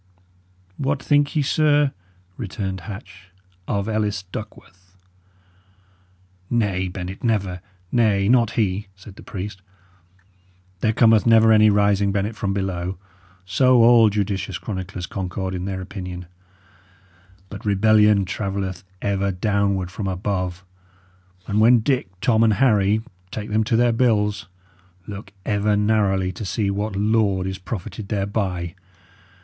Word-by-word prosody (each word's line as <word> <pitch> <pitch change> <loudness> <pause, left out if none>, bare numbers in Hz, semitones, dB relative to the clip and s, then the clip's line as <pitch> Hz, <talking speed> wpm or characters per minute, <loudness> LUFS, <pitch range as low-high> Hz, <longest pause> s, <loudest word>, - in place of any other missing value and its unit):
"What 140 0 -1
think 145 +1 +2
ye, 150 - +2
sir," 145 -1 +3 0.4
returned 95 -3 -4
Hatch, 95 -3 -10 0.4
"of 100 0 -1
Ellis 105 -2 -1
Duckworth?" 95 -2 -11 1.5
"Nay, 100 -6 0
Bennet, 90 +1 -7
never. 100 -6 -1 0.3
Nay, 105 -5 +2
not 115 -1 +3
he," 100 -1 0
said 95 +1 -14
the - - -13
priest. 100 +1 -7 1.2
"There 110 - +2
cometh 110 0 +4
never 115 -1 +6
any 110 0 +6
rising, 100 -1 +2
Bennet, 100 +2 -1
from 100 -2 -2
below 95 -2 -3 0.5
so 125 +5 +4
all 115 -2 +7
judicious 100 -2 -2
chroniclers 95 -2 -5
concord 95 0 -4
in 90 0 -4
their 95 -1 -4
opinion; 90 -2 -7 1.2
but - - -9
rebellion 105 0 +4
travelleth 95 -1 -4 0.2
ever 100 -1 0
downward 100 -1 0
from 100 +1 -4
above; 95 -1 -3 0.8
and 105 +1 +1
when 120 +1 +6
Dick, 130 0 0
Tom, 115 -2 +3
and 110 -2 +4
Harry 105 -3 +3 0.3
take 105 +1 -6
them 110 +1 +2
to 115 - +1
their 120 +1 +4
bills, 105 -4 +1 0.6
look 100 -1 -8
ever 105 0 +1
narrowly 100 -3 +1
to 95 - -7
see 100 0 -1
what 100 +1 -3
lord 100 -2 +1
is 95 0 -4
profited 100 +1 -6
thereby. 95 -4 -2
100 Hz, 125 wpm, -22 LUFS, 95-110 Hz, 1.5 s, all